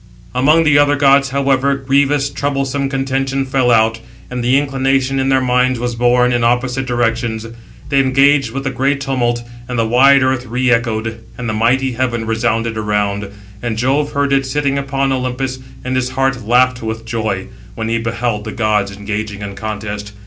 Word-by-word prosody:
Among 150 +6 +4
the 150 -2 +4
other 145 0 +4
gods, 140 -1 +4
however, 140 0 +1
grievous, 140 +1 +1
troublesome 140 -1 -2
contention 135 0 -1
fell 130 -2 +1
out, 115 -1 +3 0.3
and 125 -1 -3
the 125 +3 +3
inclination 135 -1 0
in 135 0 0
their 135 0 +3
minds 125 0 +2
was 120 0 -2
borne 125 +1 +2
in 120 -1 +1
opposite 125 +2 0
directions. 115 -2 -1 0.4
They 140 - +3
engaged 135 0 +3
with 135 +4 -5
a 135 - -1
great 135 +2 0
tumult, 120 -3 -1 0.2
and 125 -1 -4
the 115 - +2
wide 130 +4 +5
earth 130 -1 0
re 125 +2 0
echoed, 115 -1 -1
and 125 - -5
the 110 - -1
mighty 125 +5 +1
heaven 120 -2 -2
resounded 115 0 -1
around. 105 -1 -1 0.3
And 115 -2 -3
Jove 135 +5 0
heard 140 0 +1
it, 135 -1 +1
sitting 140 0 0
upon 135 0 -1
Olympus, 130 0 -2 0.3
and 130 0 -1
his 130 0 0
heart 135 -1 -1
laughed 125 +2 +2
with 110 0 -5
joy, 110 -4 -3 0.3
when 110 - -3
he 115 +1 0
beheld 115 -1 -2
the 110 - -4
gods 105 -4 0
engaging 105 0 -4
in 100 -1 -6
contest. 105 0 -5
125 Hz, 180 wpm, -16 LUFS, 115-135 Hz, 0.4 s, wide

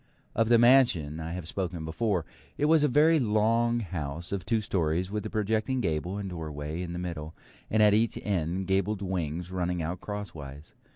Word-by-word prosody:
Of 115 0 +1
the 120 - +7
mansion 120 - +4
I 80 +1 -5
have 90 -3 -5
spoken 90 -3 -3
before. 85 +1 -1 0.3
It 145 - +1
was 155 0 +5
a - - +5
very 155 +4 +4
long 115 +1 +2
house 85 -4 -5
of 100 -3 -2
two 115 - +2
storeys, 90 -3 -1
with 105 0 -2
a - - -7
projecting 110 +4 0
gable 85 -1 -1
and 100 -1 -4
doorway 80 -2 -5
in 85 -1 -5
the - - -4
middle, 80 -3 -5 0.3
and 110 0 +4
at 105 -1 +6
each 110 +2 +2
end 95 -1 -1
gabled 95 +2 0
wings 90 -2 -3
running 90 -2 -1
out 85 +3 -4
crosswise. 80 -9 -7
95 Hz, 185 wpm, -28 LUFS, 80-110 Hz, 0.3 s, the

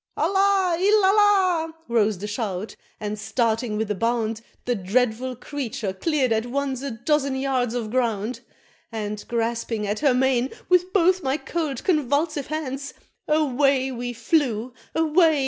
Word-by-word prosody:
"Allah! 390 -3 +2
il 410 +1 +4
Allah!" 380 -5 +3
rose 220 -3 +2
the 200 - -6
shout, 210 -2 -4 0.2
and 210 0 -4
starting 225 0 0
with 215 -1 -1
a - - +2
bound, 225 +1 -1 0.2
The 245 - +1
dreadful 240 +5 0
Creature 240 -6 -4
cleared 265 - 0
at 225 +1 +1
once 270 0 -2
a 280 - -3
dozen 270 +4 0
yards 260 -3 0
of 225 -3 -3
ground; 235 -2 -1 0.5
And 210 -2 -4
grasping 230 -2 -1
at 205 +1 -2
her 280 -4 +3
mane 260 0 +2 0.2
with 360 0 +3
both 370 -1 +3
my 270 -1 0
cold 310 -6 -3
convulsive 300 -2 +1
hands, 280 -2 -4 0.3
Away 275 -3 +2
we 245 0 -4
flew 240 -1 0 0.2
away! 320 -1 +4
255 Hz, 145 wpm, -24 LUFS, 225-310 Hz, 0.5 s, il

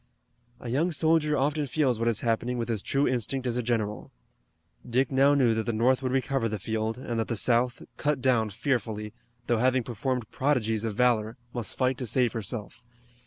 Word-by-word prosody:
A 120 - -7
young 155 +9 +1
soldier 160 -2 +3
often 145 +2 0
feels 130 -3 +1
what 115 - 0
is 115 -3 +1
happening 120 +1 0
with 120 0 -2
as 110 -4 -1
true 140 +6 +1
instinct 130 +2 -1
as 120 -2 -1
a 125 - 0
general. 110 -3 -2 0.7
Dick 125 +3 0
now 135 +2 +4
knew 125 -5 +4
that 110 -1 -2
the 120 - 0
North 125 +4 +2
would 130 -1 -1
recover 135 -2 0
the 110 - -3
field, 110 +3 -2
and 120 -2 -3
that 115 - -1
the 115 - -2
South, 120 +3 +1
cut 150 -2 0
down 120 -4 +2
fearfully, 105 -2 -2 0.3
though 120 -2 +1
having 130 +1 +2
performed 120 +1 -3
prodigies 115 -6 0
of 110 -2 -3
valor, 115 -1 +2 0.2
must 120 -3 -4
fight 130 -1 +1
to 125 - -3
save 120 +1 +2
herself. 110 -1 -5
120 Hz, 195 wpm, -27 LUFS, 115-130 Hz, 0.7 s, now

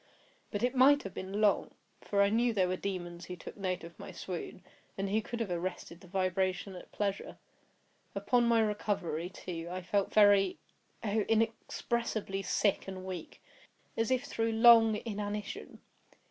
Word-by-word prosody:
But 205 +2 -3
it 250 - +2
might 275 +2 +6
have 195 - -7
been 195 +3 -4
long; 210 -2 +2 0.3
for 200 -1 +2
I 200 - +3
knew 235 +2 +2
there 190 -4 +2
were 185 - 0
demons 180 -3 -5
who 180 - -6
took - - -10
note 185 -3 -3
of 170 0 -11
my - - -8
swoon, 180 0 -6 0.3
and 195 0 -1
who 215 +2 +2
could 235 +2 -6
have 220 -5 -2
arrested 175 -1 -4
the 185 - -14
vibration 185 +1 -1
at 180 - -11
pleasure. 200 -1 -3 0.8
Upon 235 +4 +2
my 230 -1 +4
recovery, 200 -6 -1
too, 170 -2 -6
I 185 +1 -5
felt 200 +2 0
very—oh! 205 +1 +2
inexpressibly—sick 220 -2 0
and 185 -1 -6
weak, 185 -4 -7 0.5
as 225 -1 0
if 255 0 +1
through 225 -5 -1
long 225 -1 +7
inanition. 210 -1 -5
200 Hz, 155 wpm, -32 LUFS, 185-225 Hz, 0.8 s, long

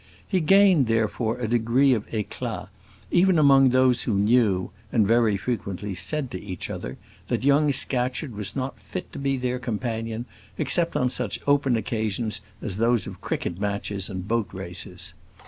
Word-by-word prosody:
He 190 - +1
gained, 185 - +5
therefore, 115 +1 0
a 125 -2 -2
degree 120 +4 +3
of 110 -3 -2
éclat, 110 -3 -4 0.4
even 185 0 +4
among 135 -3 +6
those 130 -1 +3
who 110 - 0
knew, 100 -2 +2 0.2
and 110 -4 +3
very 115 -2 +3
frequently 100 -3 -4
said 135 - -3
to 95 - -5
each 95 -3 -6
other, - - -6 0.3
that - - -1
young 145 +1 +4
Scatcherd 125 0 +1
was 105 -1 -3
not 130 0 -4
fit - - -7
to - - -6
be 135 -1 0
their 125 0 -2
companion 115 -1 -3 0.3
except 170 -1 0
on 125 -1 +1
such 125 -6 -2
open 140 -3 +3
occasions 110 -2 -2 0.2
as 100 -3 -3
those 115 0 +2
of - - -9
cricket 85 - -3
matches 100 -1 -2
and 95 -1 -6
boat 115 -2 0
races. - - -7
120 Hz, 165 wpm, -25 LUFS, 105-135 Hz, 0.4 s, among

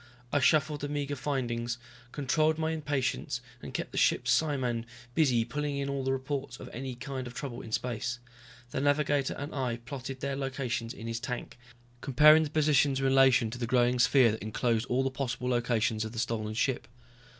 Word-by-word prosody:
I 145 - +4
shuffled 150 +1 +3
the 145 - -3
meager 145 -1 -2
findings, 120 -4 -2 0.3
controlled 155 +3 +1
my 160 0 0
impatience, 145 -6 -1 0.2
and - - -7
kept - - -4
the - - -1
ship's - - +3
psiman 130 -7 +1 0.3
busy 125 -7 +3
pulling 145 +3 -3
in 140 0 -2
all 140 -1 -2
the 135 - 0
reports 135 -1 -3
of - - -9
any 130 +1 -5
kind 130 0 -5
of 120 - -10
trouble 135 -2 -5
in 110 - -10
space. 125 +2 -2 0.5
The 130 - -2
navigator 145 -1 +2
and 145 +2 -5
I 125 -4 -1
plotted 130 +2 -7
their 140 0 -2
locations 130 -4 -3
in 115 - -9
his 115 0 -3
tank, 125 0 -5 0.5
comparing 150 +4 +7
the 155 - -1
positions 145 -2 +3
in 135 - 0
relation 130 -4 +5
to 120 - -6
the 120 - -2
growing 125 +1 +3
sphere 125 -1 +5
that 110 - -5
enclosed 115 +2 0
all 130 +1 +1
the 135 - 0
possible 125 -1 -3
locations 115 -3 +1
of 110 0 -6
the - - -8
stolen 110 -2 -2
ship. 120 -1 0
130 Hz, 190 wpm, -30 LUFS, 120-140 Hz, 0.5 s, comparing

